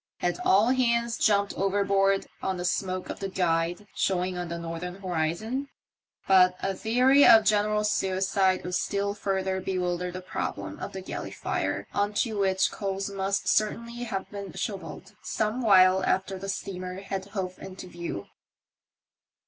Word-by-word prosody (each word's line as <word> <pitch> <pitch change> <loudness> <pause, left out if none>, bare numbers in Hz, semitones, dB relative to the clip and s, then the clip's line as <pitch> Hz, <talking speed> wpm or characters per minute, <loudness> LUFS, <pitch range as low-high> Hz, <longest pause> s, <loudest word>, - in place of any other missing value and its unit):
Had 175 0 -1
all 210 +6 +4
hands 235 -2 +2
jumped 200 -2 +2
overboard 195 0 +2 0.2
on 190 -1 -1
the 175 - -3
smoke 185 0 -1
of - - -8
the 195 - -3
Guide 175 +1 0
showing 185 -1 0
on 175 0 -3
the 170 0 -4
northern 170 +2 -5
horizon? 190 - -2 0.6
But 185 -1 +6
a 195 - -1
theory 255 +7 +4
of 225 -3 +8
general 210 0 +2
suicide 190 -1 +1
would 180 - -5
still 200 +2 0
further 190 -2 -1
bewilder 180 -1 -1
the 180 +1 -7
problem 100 - -4
of - - -6
the 190 - -5
galley 185 - -5
fire - - -2
on 205 +1 0
to 220 0 0
which 190 -1 +2
coals 195 0 -3
must 195 0 -1
certainly 235 +3 0
have 195 -4 -4
been 200 -4 -7
shovelled 190 +1 -6
some 220 +3 -1
while 190 -4 +6
after 190 0 0
the 195 +1 -6
steamer 185 -1 -5
had 195 -1 -4
hove 190 -2 -5
into 190 -1 -9
view. 170 - -6
195 Hz, 155 wpm, -27 LUFS, 185-205 Hz, 0.6 s, of